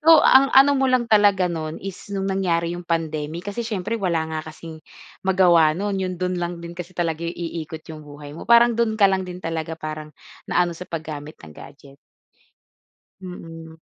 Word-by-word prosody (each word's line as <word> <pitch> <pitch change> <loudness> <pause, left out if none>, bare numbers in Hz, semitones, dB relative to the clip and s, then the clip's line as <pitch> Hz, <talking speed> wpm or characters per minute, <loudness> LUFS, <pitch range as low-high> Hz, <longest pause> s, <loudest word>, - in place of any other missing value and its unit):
So, 320 +1 +7
ang 270 +1 +7
ano 270 +2 +7
mo 265 - +2
lang 255 -1 +2
talaga 205 -3 +5
no'n 160 -2 -4
is 195 0 -8
'nong 195 -1 -3
nangyari 175 -3 0
'yong 175 0 -7
pandemic, 160 0 -2
kasi 235 - -4
siyempre 220 +1 -3
wala 170 -4 +1
nga 155 - -2
kasing 160 0 -10 0.5
magawa 175 -5 +4
no'n. 200 +1 -2
'Yong 185 -1 -3
do'n 180 +1 -2
lang 175 0 -3
din 170 - -7
kasi 175 +1 -9
talaga 165 -2 -1
iikot 165 -2 -6
'yong 155 -1 -8
buhay 145 0 -10
mo, 155 - -10
parang 235 0 +7
do'n 230 -1 0
ka 210 - +4
lang 190 -1 0
din 180 0 -7
talaga 165 0 -3
parang, 155 -1 -6 0.4
naano 175 -1 +2
sa 180 +2 -10
paggamit 155 -2 -6
ng 75 -2 -14
gadget. 140 - -14 1.3
Mm. 165 -3 -10
175 Hz, 180 wpm, -22 LUFS, 160-195 Hz, 1.3 s, So